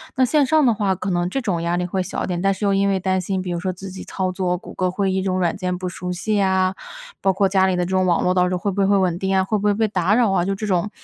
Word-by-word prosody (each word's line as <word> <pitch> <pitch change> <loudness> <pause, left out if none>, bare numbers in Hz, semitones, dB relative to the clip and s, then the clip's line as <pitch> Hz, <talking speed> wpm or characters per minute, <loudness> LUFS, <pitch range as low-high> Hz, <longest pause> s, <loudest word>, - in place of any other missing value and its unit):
那 260 - +3
线 285 +2 +3
上 310 +1 +3
的 235 - +4
话， 200 -3 0
可 190 +2 -4
能 175 0 0
这 270 - -2
种 185 -7 -1
压 170 +1 0
力 180 0 -1
会 185 +1 -2
小 - - -4
一 - - -3
点， 175 -1 -2
但 195 0 +2
是 190 - -8
又 200 - +2
因 200 0 +2
为 195 -1 +1
担 185 0 0
心， 185 +1 -2
比 180 -1 -4
如 170 - -2
说 185 0 -2
自 190 +2 -9
己 190 - -8
操 185 -1 -2
作 180 -1 -1
谷 - - -11
歌 185 -1 0
会 190 +1 -1
议 190 0 0
这 - - -5
种 185 -1 0
软 170 -2 0
件 180 -2 -2
不 185 0 -4
熟 180 0 -5
悉 205 +4 -1
啊， 190 -1 +2 0.5
包 195 -1 +2
括 195 0 +2
家 190 -1 +3
里 185 - +1
的 180 0 0
这 - - -6
种 185 0 +1
网 175 -2 +2
络 180 - +2
到 180 -1 +3
时 180 - -1
候 - - -1
会 200 +2 -1
不 200 - -4
会 - - +3
会 200 0 +4
稳 180 -3 +1
定 190 0 0
啊？ 190 - +3
会 210 +2 -1
不 205 - -5
会 205 - +4
被 220 +1 +1
打 190 +1 +1
扰 235 -5 +3
啊？ 175 -2 +1
就 195 0 -1
这 215 - -5
种 190 0 0
190 Hz, 380 characters per minute, -21 LUFS, 180-200 Hz, 0.5 s, 的